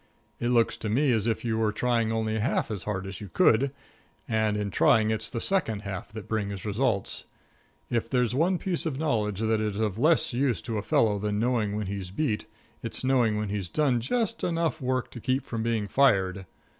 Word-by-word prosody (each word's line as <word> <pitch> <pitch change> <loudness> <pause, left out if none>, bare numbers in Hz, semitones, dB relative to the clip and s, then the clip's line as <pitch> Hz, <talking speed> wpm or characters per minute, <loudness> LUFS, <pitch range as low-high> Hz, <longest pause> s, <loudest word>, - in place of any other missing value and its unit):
It 120 - 0
looks 120 -2 +3
to 110 - -4
me 135 +5 +3
as 110 -2 +1
if 115 +1 -1
you 110 -1 0
were 110 -1 +2
trying 115 0 +1
only 110 -1 -1
half 115 0 0
as 100 -4 -4
hard 95 -2 -2
as 95 0 -7
you 100 - -7
could, 135 - +3 0.6
and 110 -2 +1
in 105 -1 -2
trying 110 +2 +4
it's 110 0 -2
the 115 - -3
second 115 - 0
half 95 0 -6
that 110 -3 -7
brings 100 -3 -3
results. 105 -1 -1 0.6
If 115 -1 -1
there's 125 -2 +1
one 170 +7 +2
piece 175 -2 -1
of 140 -4 -3
knowledge 110 -9 0
that 110 -1 +1
is 105 -1 -2
of 110 -1 -1
less 160 +1 +3
use 125 -3 +1
to 115 -3 -2
a - - -2
fellow 105 0 +2
than 105 0 -1
knowing 110 -3 0
when 105 0 -2
he's 95 -1 -4
beat, 110 +1 -2 0.3
it's - - -4
knowing 125 -5 +2
when 105 -1 -2
he's 100 -4 -3
done 140 - +2
just 220 - -1
enough 165 -2 0
work 130 -1 -1
to 120 - -8
keep 130 +3 -1
from 115 -4 -4
being 110 -2 0
fired. 95 -6 +2
110 Hz, 205 wpm, -27 LUFS, 105-130 Hz, 0.6 s, trying